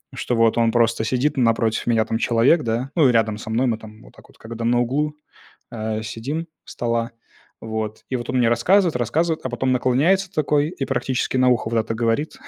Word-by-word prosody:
что 125 - -2
вот 115 0 +3
он 115 -1 +3
просто 115 -2 +2
сидит, 130 +6 0
напротив 115 -2 +1
меня 115 -2 +2
там 110 - -2
человек, 120 +8 +3
да. 120 +4 -2
Ну, 150 -6 +5
и - - +4
рядом 110 -2 +1
со 110 - -9
мной 115 +4 +1
мы 115 -2 0
там 110 0 -13
вот - - -18
так - - -18
вот, - - -22
когда 115 +1 -8
на 120 +1 +2
углу, 145 +5 -1 0.6
а, 110 -2 -4
сидим 115 +8 -4
у 165 - -12 0.2
стола. 115 -1 -2 0.5
Вот. 110 -1 -5
И 130 - 0
вот 120 - -5
он 130 - 0
мне 120 -2 +3
рассказывает, 170 - +3
рассказывает, 155 +8 -1
а 130 - -3
потом 130 +2 -1
наклоняется 160 +10 +2
такой 150 -1 +1
и 140 -6 -4
практически 130 0 -1
на 130 0 +4
ухо 120 -2 +1
вот 115 - +1
это 115 0 -1
говорит. 115 +6 -1
120 Hz, 215 wpm, -21 LUFS, 115-135 Hz, 0.6 s, Ну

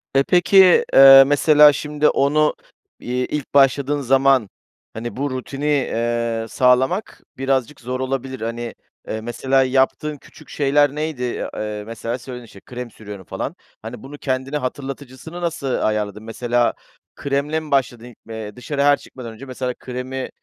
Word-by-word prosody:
Eee, 135 - +5
peki, 180 +1 +5
eee, 135 0 +10
mesela 150 0 +6
şimdi 150 +1 0
onu, 150 +2 +2 0.4
iii, 125 +1 -2
ilk 150 -2 -5
başladığın 140 +1 +3
zaman, 135 -3 +3 0.4
hani, 115 +2 -6
bu 140 +2 -1
rutini, 135 +3 -5
eee, 115 -5 -1
sağlamak 130 +10 +1 0.2
birazcık 135 0 -1
zor 125 +2 -4
olabilir. 130 -1 -4
Hani, 115 +1 -5 0.3
eee, 110 - -4
mesela 130 +3 +1
yaptığın 135 +3 0
küçük - - -18
şeyler 145 0 +2
neydi? 150 -4 -3 0.3
Eee, 105 -1 -4
mesela 115 +2 -5
söyledin, 125 -1 -9
işte, 100 -3 -15
"krem 125 -1 -7
sürüyorum" 105 -4 -10
falan. - - -5 0.3
Hani, 110 +1 -9
bunu 140 +2 -10
kendine 135 +1 -2
hatırlatıcısını 135 +4 -7
nasıl 165 -5 -3
ayarladın? 105 -4 -1
Mesela 120 +1 0 0.4
kremle 140 +3 -1
mi 155 -2 -11
başladın? 120 -3 -1
Eee, 110 -2 -7
dışarıya 140 +3 -1
her 145 0 +5
çıkmadan 120 -4 -10
önce 125 +5 -11
mesela 130 -1 -4
kremi, 130 +1 -6
130 Hz, 145 wpm, -20 LUFS, 120-145 Hz, 0.4 s, eee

